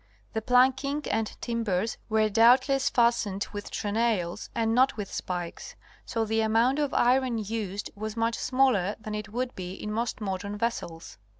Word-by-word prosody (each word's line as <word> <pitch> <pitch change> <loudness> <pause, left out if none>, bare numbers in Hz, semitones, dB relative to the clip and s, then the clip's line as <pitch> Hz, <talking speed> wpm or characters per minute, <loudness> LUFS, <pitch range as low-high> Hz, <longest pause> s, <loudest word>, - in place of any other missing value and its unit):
The 220 - -1
planking 265 +4 +3
and 225 -1 0
timbers 225 -3 -1
were 215 0 +3
doubtless 250 +5 +4
fastened 235 -5 +1
with 205 0 -6
trenails 210 -5 -1
and 225 -1 +1
not 255 0 +3
with 205 -2 -5
spikes, 175 -2 -5 0.3
so 225 -1 -1
the 220 +1 +1
amount 230 +6 +2
of 290 -2 0
iron 250 -1 +2
used 210 -2 -4
was 215 +2 -6
much 230 +1 +1
smaller 255 -7 +2
than 215 -1 -6
it 210 -1 -4
would 250 +3 -3
be 180 -1 -6
in 210 +2 -6
most 230 +1 -2
modern 200 0 -4
vessels. 170 - -4
225 Hz, 160 wpm, -27 LUFS, 205-245 Hz, 0.3 s, doubtless